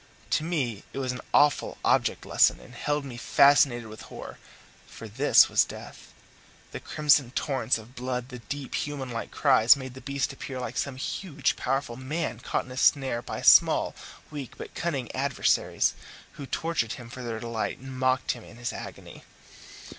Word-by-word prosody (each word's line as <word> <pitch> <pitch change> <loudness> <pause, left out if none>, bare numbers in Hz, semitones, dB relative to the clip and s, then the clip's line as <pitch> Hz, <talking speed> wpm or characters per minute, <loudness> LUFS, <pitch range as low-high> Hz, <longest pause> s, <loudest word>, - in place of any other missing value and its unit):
To 155 - +2
me 135 - -2
it - - -7
was 130 -2 -1
an 125 - -6
awful 145 0 +3
object - - +2
lesson, - - +4
and - - -15
held 145 -1 -2
me 125 -3 -8
fascinated 135 -2 +4
with 110 0 -10
horror. - - -9 0.5
For 115 - -10
this 130 +8 +5
was - - +4
death! - - -11 0.6
The - - -6
crimson 145 -4 +3
torrents 130 -5 0
of 110 +2 -13
blood, 125 0 -4
the 125 -2 -8
deep, 135 +4 -6
human 140 -4 -3
like 115 - -4
cries, 110 +5 +5
made 130 -2 -8
the 130 - -11
beast 140 +2 -2
appear 135 -1 -6
like 125 - -5
some 140 -2 -2
huge, 145 +1 -2
powerful 135 -2 -2
man 130 -3 -3
caught - - -2
in 130 - -12
a 130 - -8
snare 130 -3 +2
by - - -6
small, - - +6 0.4
weak, 145 -4 -7
but - - -9
cunning 140 -8 -3
adversaries, 135 0 +1 0.4
who 140 -3 -9
tortured 160 -9 -1
him 120 - -9
for 125 +2 -9
their 115 -2 -4
delight 115 -1 -3
and 130 0 -9
mocked 130 0 +2
him 120 - -7
in 115 - -14
his 120 0 -4
agony. - - -9
130 Hz, 175 wpm, -27 LUFS, 120-140 Hz, 0.6 s, small